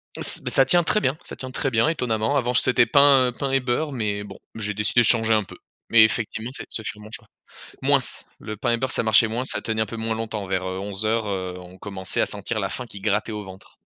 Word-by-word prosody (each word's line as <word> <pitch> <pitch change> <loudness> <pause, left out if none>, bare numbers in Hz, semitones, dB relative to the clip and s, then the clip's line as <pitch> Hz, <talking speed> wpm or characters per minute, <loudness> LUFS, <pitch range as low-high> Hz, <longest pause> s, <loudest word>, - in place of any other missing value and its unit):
M - - -7
ç - - +2
bah - - -2
ça 135 - +5
tient 175 +3 +4
très 210 - +2
bien, 135 -2 0
ça - - -2
tient 130 -1 -6
très 135 +1 -1
bien 115 0 +2
étonnamment, 125 -4 0
avant 125 -1 0
j 125 - +4
c'était 120 -1 +4
pain 140 -2 +5
pain 140 -2 -2
et 135 - +3
beurre 130 +4 -1
mais 105 -5 -2
bon. 100 -1 -10 0.2
J'ai 105 -2 -3
décidé 105 +4 +2
de - - +2
changer 115 0 +3
un 110 -1 +3
peu, 95 - -13 0.3
mais 115 -1 +8
effectivement 110 +1 0
c'est - - -6
ce - - -5
fut 110 - -6
un - - -13
bon 105 - -12
choix. 110 -1 -7 0.6
Moins, - - +5 0.4
le 105 - -7
pain 120 +4 -1
et 120 - +3
beurre 130 +2 -2
ça - - 0
marchait 110 0 +4
moins, 120 +4 -2
ça 105 -5 -2
tenait 110 +1 -1
un - - -1
peu 115 - -7
moins 110 0 -1
longtemps, 110 -2 -4
vers, 95 0 -1
heu, 95 0 -4
11:00 110 +3 -1
heu, 95 -2 -3
on 90 0 -12
commençait 95 -1 -4
à - - +3
sentir - - -4
la - - -1
faim 125 - -6
qui 100 -3 -10
grattait 105 +2 0
au 105 -1 -5
ventre. 95 0 -13
110 Hz, 270 wpm, -23 LUFS, 105-125 Hz, 0.6 s, mais